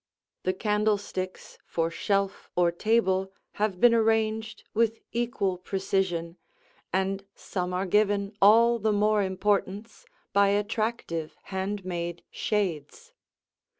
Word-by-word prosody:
The 185 Hz, -, 0 dB
candlesticks 205 Hz, -2 st, -2 dB
for 165 Hz, 0 st, -1 dB
shelf 195 Hz, +3 st, -1 dB
or 175 Hz, -1 st, +3 dB
table 190 Hz, -1 st, +1 dB, 0.3 s
have 205 Hz, -4 st, 0 dB
been 240 Hz, +2 st, +6 dB
arranged 220 Hz, -1 st, +1 dB
with 225 Hz, 0 st, +1 dB
equal 230 Hz, -6 st, -1 dB
precision, 185 Hz, -3 st, -1 dB, 0.5 s
and 195 Hz, +1 st, 0 dB
some 180 Hz, -2 st, -4 dB
are 180 Hz, +1 st, -1 dB
given 205 Hz, +1 st, +1 dB
all 230 Hz, +4 st, +6 dB
the 215 Hz, 0 st, +1 dB
more 210 Hz, +1 st, +3 dB
importance 200 Hz, +2 st, -1 dB, 0.3 s
by 200 Hz, 0 st, +5 dB
attractive 205 Hz, -5 st, -1 dB
hand 195 Hz, 0 st, -4 dB
made 175 Hz, -1 st, -4 dB
shades. 210 Hz, -, -2 dB
200 Hz, 110 wpm, -27 LUFS, 185-215 Hz, 0.5 s, been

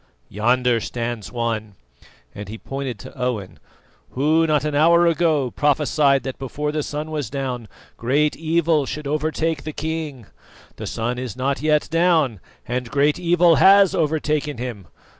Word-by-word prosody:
Yonder 120 Hz, +3 st, +2 dB
stands 115 Hz, -2 st, -4 dB
one," 115 Hz, -4 st, -3 dB, 0.6 s
and 100 Hz, -1 st, -8 dB
he 110 Hz, -, -6 dB
pointed 135 Hz, -1 st, -5 dB
to -, -, -12 dB
Owen, 125 Hz, -7 st, -3 dB, 0.5 s
"who 155 Hz, +5 st, +2 dB
not 150 Hz, -2 st, +1 dB
an 150 Hz, -, -1 dB
hour 170 Hz, +4 st, +5 dB
ago 160 Hz, -6 st, +2 dB
prophesied 145 Hz, -1 st, +2 dB
that 130 Hz, -, -6 dB
before 150 Hz, +3 st, -3 dB
the 150 Hz, 0 st, -1 dB
sun 150 Hz, +2 st, -5 dB
was 145 Hz, -7 st, -3 dB
down 130 Hz, -4 st, -4 dB, 0.3 s
great 145 Hz, +5 st, +1 dB
evil 160 Hz, -2 st, +1 dB
should 150 Hz, 0 st, -5 dB
overtake 155 Hz, +1 st, -1 dB
the 155 Hz, -, -5 dB
king. 155 Hz, -6 st, -4 dB, 0.5 s
The -, -, -6 dB
sun 120 Hz, +2 st, -2 dB
is 125 Hz, -1 st, -6 dB
not 135 Hz, +2 st, -1 dB
yet 150 Hz, -1 st, +2 dB
down, 165 Hz, -, +2 dB, 0.3 s
and 125 Hz, 0 st, -3 dB
great 145 Hz, +5 st, +2 dB
evil 175 Hz, -1 st, +4 dB
has 195 Hz, 0 st, +6 dB
overtaken 150 Hz, -3 st, 0 dB
him. 115 Hz, -7 st, -6 dB
145 Hz, 150 wpm, -21 LUFS, 125-155 Hz, 0.6 s, has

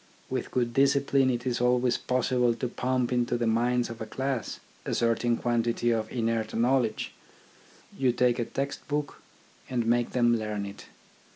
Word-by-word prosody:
With -, -, -2 dB
good 120 Hz, -2 st, 0 dB
discipline, 140 Hz, 0 st, +3 dB
it 120 Hz, -1 st, -2 dB
is 125 Hz, -1 st, -1 dB
always 125 Hz, 0 st, +2 dB
possible 125 Hz, -1 st, +1 dB
to 125 Hz, -, -2 dB
pump 125 Hz, 0 st, -1 dB
into 120 Hz, 0 st, +1 dB
the 120 Hz, -, -1 dB
minds 120 Hz, +2 st, +2 dB
of 115 Hz, -1 st, -8 dB
a 110 Hz, -, -4 dB
class 130 Hz, 0 st, -3 dB, 0.2 s
a -, -, -2 dB
certain 115 Hz, 0 st, +1 dB
quantity 120 Hz, 0 st, +1 dB
of 110 Hz, -1 st, -1 dB
inert 115 Hz, -2 st, -1 dB
knowledge. 120 Hz, -1 st, +1 dB, 0.8 s
You 130 Hz, -2 st, +2 dB
take 125 Hz, 0 st, +2 dB
a 120 Hz, -, 0 dB
text 140 Hz, +3 st, -4 dB
book 145 Hz, -1 st, -3 dB, 0.5 s
and 120 Hz, -3 st, 0 dB
make 120 Hz, +1 st, +2 dB
them 120 Hz, -2 st, +3 dB
learn 105 Hz, -2 st, -3 dB
it. 100 Hz, +1 st, -9 dB
120 Hz, 165 wpm, -28 LUFS, 115-125 Hz, 0.8 s, discipline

